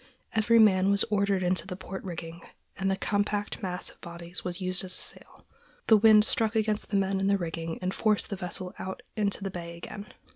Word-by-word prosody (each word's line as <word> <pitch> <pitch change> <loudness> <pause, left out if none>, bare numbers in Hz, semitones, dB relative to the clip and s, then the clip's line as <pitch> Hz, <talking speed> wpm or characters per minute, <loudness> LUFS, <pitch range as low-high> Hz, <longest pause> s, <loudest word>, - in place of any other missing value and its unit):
Every 225 +1 +4
man 195 -3 +5
was 200 0 +4
ordered 200 -2 +2
into 180 +1 0
the 185 - -5
port 190 +1 -7
rigging, 170 -2 -7 0.3
and 195 0 -1
the 195 - +2
compact 205 +1 -1
mass 180 -2 -3
of - - -23
bodies 170 +1 -5
was 180 0 -3
used 185 -1 +1
as 185 -1 -4
a - - -7
sail. - - -6 0.4
The 220 - +7
wind 215 0 +7
struck 225 0 +1
against 215 -1 0
the 205 - +1
men 195 0 +1
in 195 - +1
the 200 0 +3
rigging 165 -2 -4
and 185 +1 -1
forced 215 -1 +1
the - - -1
vessel 180 0 -3
out 190 +6 -6
into 205 -2 -1
the 195 - -3
bay 170 -1 -7
again. 200 +4 -8
195 Hz, 215 wpm, -28 LUFS, 180-205 Hz, 0.4 s, The